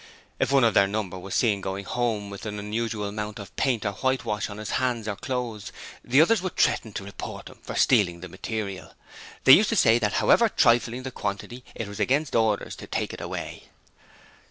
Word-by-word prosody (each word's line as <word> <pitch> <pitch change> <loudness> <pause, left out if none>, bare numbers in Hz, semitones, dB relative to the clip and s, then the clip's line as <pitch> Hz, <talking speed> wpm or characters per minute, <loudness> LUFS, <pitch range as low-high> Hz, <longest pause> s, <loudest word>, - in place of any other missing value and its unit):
If - - +1
one 135 -2 +5
of 115 -3 +4
their 100 - +5
number 100 -3 -3
was 95 +1 -6
seen 105 -5 +2
going 95 +1 -4
home 110 -3 -2
with 100 +2 -7
an 105 0 -5
unusual 105 +1 -3
amount 105 +1 -5
of 100 -2 -10
paint 125 -6 0
or 100 - +1
whitewash 115 -2 -1
on 105 - -8
his 105 -1 -5
hands 120 -4 -1
or 105 - -2
clothes, 120 -2 -4 0.3
the 130 +3 +3
others 205 +5 +4
would 185 -2 -5
threaten 110 - +2
to 95 - -5
report 100 0 -8
him - - -16
for - - -7
stealing 90 -9 +3
the 95 - -7
material. 100 +2 -5 0.5
They 135 - +9
used 215 - +6
to 225 - 0
say 120 - +5
that 105 -2 0
however 230 -1 +4
trifling 120 - +2
the 130 - -5
quantity, 115 +3 -5
it 115 - -4
was 100 0 -8
against 145 +3 +1
orders 110 -3 +1
to - - -10
take - - -2
it - - -8
away. - - -6
110 Hz, 205 wpm, -26 LUFS, 100-125 Hz, 0.5 s, They